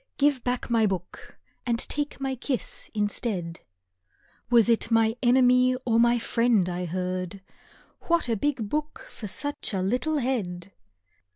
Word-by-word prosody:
Give 280 -3 +2
back 245 -1 -2
my 225 -2 +4
book 185 -3 -6 0.3
and 235 -2 0
take 290 +4 -2
my 270 -1 -2
kiss 260 -1 -3
instead. 205 -5 -2 0.9
Was 235 -3 +5
it 230 -1 +2
my 225 -1 +3
enemy 250 0 +4
or 230 -2 +3
my 240 +1 +4
friend 230 -4 +2
I 180 0 -3
heard? 185 +2 -3 0.7
"What 340 -5 +2
a 230 - +1
big 240 -1 -1
book 300 +6 -4
for 215 - -7
such 285 0 -2
a 190 - 0
little 250 +10 0
head!" 200 -9 -2
235 Hz, 145 wpm, -26 LUFS, 195-255 Hz, 0.9 s, Was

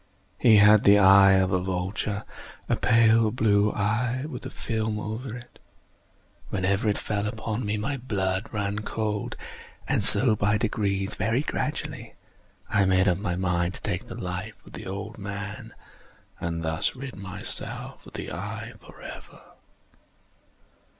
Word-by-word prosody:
He 115 -3 +6
had 105 0 +7
the 100 0 +7
eye 95 0 +7
of 95 -1 +3
a 90 -2 +2
vulture—a 95 +3 -3
pale 115 -1 +4
blue 105 -2 +3
eye, 120 +5 0
with 155 - -7
a - - -6
film 110 -2 -2
over 110 +3 -5
it. 120 0 -14 0.9
Whenever 100 +3 +1
it 105 - +1
fell 105 0 -2
upon 110 +2 -3
me, 105 +1 0
my 135 +7 -2
blood 95 -5 -1
ran 105 0 -2
cold; 105 -1 -3 0.5
and - - +1
so 120 -4 +3
by 105 +1 +2
degrees—very 105 +2 0
gradually—I 100 -7 -4
made 95 +1 +3
up 90 -1 +2
my 100 -4 -2
mind 90 -1 0
to - - -9
take - - -2
the - - -7
life - - -4
of - - -15
the - - -8
old 100 +3 -6
man, 100 +1 -6 0.6
and 85 0 -3
thus 80 +7 0
rid 130 0 -7
myself 95 -1 -5
of - - -13
the - - -6
eye - - -5
forever. - - -11
105 Hz, 140 wpm, -26 LUFS, 95-110 Hz, 0.9 s, had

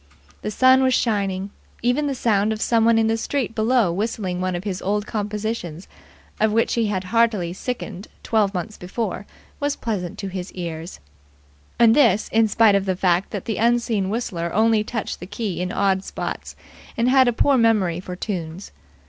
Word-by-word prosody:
The - - -3
sun 260 +4 +5
was 260 -1 +3
shining. 200 -3 -1 0.3
Even 255 +5 +1
the 275 - -2
sound 215 -3 +1
of 215 - -3
someone 230 0 +3
in 225 - +3
the 225 0 +1
street 255 0 -2
below 225 -4 +2
whistling 190 -2 -2
one 185 -1 -1
of 175 - -4
his 195 -3 -4
old 205 +2 -1
compositions, 210 -5 -4 0.5
of 220 0 +3
which 225 +2 +1
he 230 -2 +1
had 190 -3 -2
heartily 205 -3 +1
sickened 215 -2 -5 0.2
twelve 215 -3 +2
months 205 +3 -5
before, 200 +2 -4 0.3
was 285 0 0
pleasant 190 -7 -4
to 195 - -5
his 185 0 -6
ears, 170 -1 -6 0.8
and 230 -1 +6
this 230 -8 +3
in 225 0 +3
spite 215 0 +4
of 200 -1 +2
the 190 -1 0
fact 180 0 +1
that 200 -4 -5
the 220 - -2
unseen 230 -4 +1
whistler 180 -7 -3
only 220 0 +3
touched 225 -1 -4
the 180 - -8
key 200 -4 -4
in 180 0 -2
odd 195 -1 +1
spots - - -5 0.4
and 235 +1 +2
had 260 0 +5
a - - +4
poor 275 +4 +2
memory 215 -8 +2
for 180 0 -7
tunes. 180 -2 -5
210 Hz, 180 wpm, -22 LUFS, 185-230 Hz, 0.8 s, and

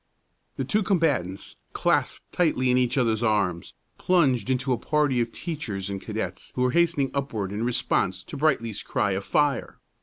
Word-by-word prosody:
The - - -2
two 215 - +1
combatants, 150 - 0 0.2
clasped - - +1
tightly 130 -7 +2
in 125 - +3
each 125 +1 +1
other's 115 -4 +2
arms, 100 -7 0 0.2
plunged 140 -10 +2
into 130 0 +1
a - - 0
party 145 -3 +1
of 115 0 -2
teachers 105 - -4
and 100 -1 -4
cadets - - -5
who 125 - +1
were 125 - +2
hastening 165 -4 +2
upward 110 -9 -2
in 105 +2 -3
response 95 -6 0
to - - -9
Brightly's 135 -8 0
cry 100 - 0
of 95 +1 -2
"Fire!" 145 +1 0
125 Hz, 170 wpm, -25 LUFS, 105-150 Hz, 0.2 s, in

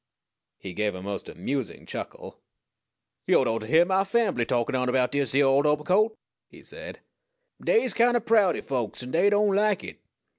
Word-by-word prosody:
He 95 -2 -9
gave 105 0 -2
a 90 - -8
most 100 0 -5
amusing 135 -6 -4
chuckle. - - -8 0.9
"Yo'd - - +3
ought 115 0 0
to 110 - -8
hyear 165 +7 +5
mah 190 +1 +1
fambly 195 - 0
takin' 120 -1 -1
on 125 -1 0
erbout 125 0 +1
dis 140 -3 0
yere 140 0 +4
old 135 +2 +3
obercoat!" 185 +9 +1 0.3
he - - -17
said. - - -10 0.6
"Dey's 455 -1 +2
kind 240 +1 +3
o' - - +1
proudy 215 -6 +2
folks, 125 -3 -3
an' 125 - -8
dey 180 +5 +3
don't 205 -1 +2
like 210 -1 +1
it. - - -9
145 Hz, 180 wpm, -26 LUFS, 125-205 Hz, 0.9 s, hyear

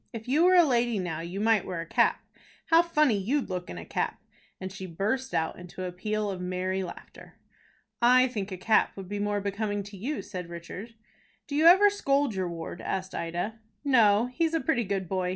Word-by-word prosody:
"If 225 0 -7
you 300 +7 +3
were 370 0 +6
a 350 - +8
lady 240 -5 +1
now, 175 -4 -3
you 175 +4 -5
might 220 -1 +3
wear 180 -2 -5
a 165 - -4
cap. - - +2 0.5
How 330 +1 +8
funny 305 -8 +2
you'd 250 +4 -1
look 180 -1 -4
in 85 - -7
a 85 - -7
cap!" - - -2 0.4
and 185 0 -6
she 190 -1 -7
burst 220 +10 -2
out 160 +1 -1
into 180 +1 -8
a 180 - -3
peal 210 +3 -2
of 185 -2 -6
merry 185 +1 -2
laughter. 180 - -10 0.7
"I 255 +2 +6
think 210 -5 -4
a 185 - -4
cap 215 +3 +2
would 190 -2 -7
be 205 +2 -4
more 205 0 -1
becoming 205 0 -2
to 200 0 -11
you," 270 +10 -3
said 180 -4 -7
Richard. 180 +7 -8 0.5
"Do 285 - -5
you 315 +3 +5
ever 390 +4 +8
scold 280 - +1
your 185 -2 -2
ward?" 170 +1 -7
asked 190 0 -3
Ida. 175 +7 -3 0.2
"No, 230 -6 +4
he's 330 +4 +1
a - - +2
pretty 250 -8 0
good 195 -1 -2
boy. 185 0 -1
205 Hz, 210 wpm, -28 LUFS, 185-250 Hz, 0.7 s, a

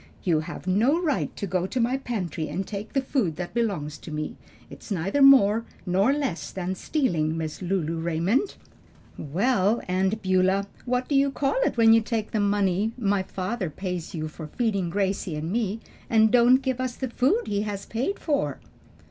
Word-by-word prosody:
"You 165 -4 +2
have 170 +3 -7
no 225 - +3
right 315 -6 0
to 205 - -3
go 185 -1 -1
to 255 - -3
my 240 +2 +2
pantry 185 - -3
and 180 +6 -3
take 205 +2 -6
the 270 -1 +1
food 235 - 0
that 175 +1 -6
belongs 185 -11 -2
to - - -10
me. 155 0 -4 0.3
It's - - -12
neither 195 - 0
more 230 -5 +7 0.2
nor 195 +7 +3
less 280 - -2
than 185 0 -3
stealing, 170 - 0
Miss 160 +1 -4
Lulu 170 -3 -1
Raymond." 170 - 0 0.6
"Well, 200 - +1
Aunt 190 +3 0
Beulah, 190 +1 +2 0.2
what 250 0 0
do - - -2
you 275 0 +4
call 275 - -1
it - - 0
when 225 -1 +7
you 225 - +5
take 220 -1 -3
the 220 - 0
money 205 +1 +1
my 200 -4 +1
father 190 +1 -3
pays 180 +2 -5
you 155 -1 -3
for 155 0 -8
feeding 200 -1 -1
Gracie 190 -2 -1
and 155 +3 -4
me, 220 -1 -1 0.3
and 220 -1 +4
don't 250 +2 +5
give 260 -1 -1
us 255 -1 -2
the 260 -3 -4
food 350 - +2
he 205 0 -1
has 205 -2 -4
paid 260 - -2
for?" 150 - -1
200 Hz, 185 wpm, -25 LUFS, 180-240 Hz, 0.6 s, more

